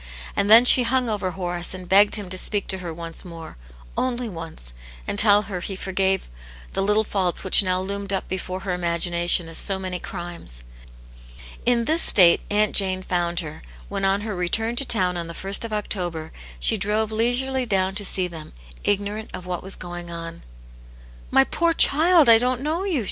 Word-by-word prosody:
And 200 0 0
then 230 +3 +8
she 250 - +10
hung 250 0 0
over 205 -3 -2
Horace 175 -1 -5
and 185 -1 -9
begged 200 +2 +5
him 205 -3 -5
to 185 - -1
speak 205 0 -1
to 190 - -2
her 175 -2 -6
once 165 0 -6
more, 165 -2 -11 0.4
only 250 -1 -2
once, 165 - -4 0.3
and 200 - -2
tell 205 -1 +5
her 195 -3 -6
he 195 +2 -6
forgave 190 0 -1 0.5
the - - -1
little 210 +2 +2
faults 190 -4 -2
which 190 - +6
now 185 -2 -1
loomed 200 +1 -4
up 195 - -2
before 185 0 -5
her 195 -2 -3
imagination 175 0 +1
as 165 - -2
so 195 -2 +1
many 185 -1 -5
crimes. 170 - -7 1.0
In 235 -1 +2
this 320 +5 +2
state 175 -4 +6
Aunt 210 0 +1
Jane 185 -2 +1
found 175 -1 -1
her, 155 -2 -9 0.3
when - - -4
on 195 +1 +2
her 210 -1 -5
return 225 +6 -1
to 275 - 0
town 185 -7 +2
on 170 -1 -4
the 170 - -9
ist 200 +3 +3
of 230 - -6
October, 175 -6 -3 0.3
she - - +2
drove 215 +1 -1
leisurely 245 +3 0
down 190 -2 0
to 205 +1 -2
see 185 -2 +1
them, 165 -3 -11 0.3
ignorant 205 +2 -2
of 180 - -9
what 180 -1 -4
was 190 +1 0
going 175 0 -8
on. 165 0 -8 0.9
"My 135 - +4
poor 335 - 0
child, 325 0 +4
I 225 -1 +7
didn't 250 +1 -1
know 320 +6 -2
you!" 355 -8 -1
195 Hz, 190 wpm, -22 LUFS, 175-220 Hz, 1.0 s, she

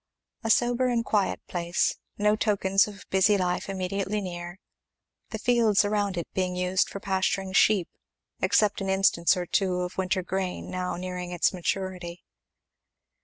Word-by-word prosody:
A 225 - -2
sober 245 +3 +3
and 235 -2 0
quiet 205 -3 0
place, 175 -1 0 0.2
no 210 +1 +3
tokens 200 -2 +2
of 205 -1 -11
busy 195 +2 +4
life 180 0 -1
immediately 195 +2 -2
near, 175 -2 -6 0.7
the 220 - -4
fields 225 -3 +3
around 205 -2 0
it 170 - -3
being 185 -1 -1
used 180 +1 +1
for 200 - -6
pasturing 190 0 -1
sheep, 195 -3 +4 0.5
except 210 -1 +2
an 195 - -2
instance 190 -2 +3
or 180 - -2
two 180 0 0
of 180 +1 -4
winter 185 0 0
grain 185 0 -3
now 180 0 -2
nearing 180 0 -5
its 175 +1 +1
maturity. 180 -1 -4
190 Hz, 150 wpm, -27 LUFS, 180-205 Hz, 0.7 s, busy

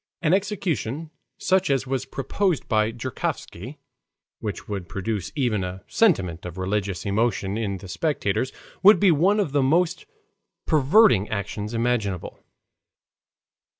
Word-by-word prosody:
An 165 +1 +3
execution 165 - -1 0.3
such 190 -2 +1
as 135 -2 +1
was 130 0 -2
proposed 170 +5 -1
by 110 -1 +2
Joukovsky, 120 - -5 0.6
which 105 -3 -5
would 100 -4 -5
produce 100 -1 -3
even 120 -9 0
a 90 +1 -6
sentiment 95 - +2
of 90 0 -7
religious 95 -1 -2
emotion 100 -1 0
in 105 -3 -2
the 95 - -11
spectators, 130 - -1 0.3
would 205 +3 +7
be 200 -3 +5
one 185 +7 +3
of 190 -9 0
the 145 0 +2
most 170 +6 +1 0.6
perverting 155 - +4
actions 105 +1 -4
imaginable. 115 -6 -1
120 Hz, 125 wpm, -24 LUFS, 100-160 Hz, 0.6 s, would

